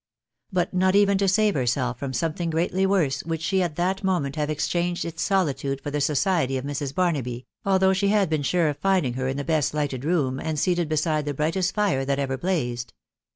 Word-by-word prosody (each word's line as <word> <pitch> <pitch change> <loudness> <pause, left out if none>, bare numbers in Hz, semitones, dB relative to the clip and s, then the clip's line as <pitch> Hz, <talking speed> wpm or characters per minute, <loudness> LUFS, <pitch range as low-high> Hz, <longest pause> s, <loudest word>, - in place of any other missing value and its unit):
But 180 -1 0
not 185 +1 +2
even 200 -1 +4
to 200 - +2
save 210 +2 +3
herself 125 -2 -1
from 140 -2 -3
some* 155 +6 -1
thing 170 0 -3
greatly 175 +4 +1
worse, 175 -9 +1
would 165 -1 -3
she 175 +4 0
at 170 -4 -1
that 185 +3 -1
moment 175 -8 0
have 150 -1 -1
exchanged 175 +3 -1
its 165 -1 -5
solitude 145 -8 0
for 145 +1 -6
the 145 0 -1
society 145 -1 +1
of 130 - -5
Mrs. 140 -1 -4
Barnaby, 130 -9 -1 0.2
although 190 -1 +3
she 195 +1 +1
had 205 -1 +3
been 155 -2 0
sure 165 +4 +1
of 145 - -3
finding 185 -8 +1
her 130 +1 -2
in 135 +1 -2
the 140 - -2
best 155 -1 0
lighted 140 -4 -2
room, 145 -5 0
and 160 -1 -3
seated 175 0 +1
beside 155 -1 0
the 145 -1 -3
brightest 175 +6 0
fire 200 -11 +1
that 140 0 0
ever 135 -1 -1
blazed. 125 - -2
155 Hz, 215 wpm, -24 LUFS, 140-185 Hz, 0.2 s, even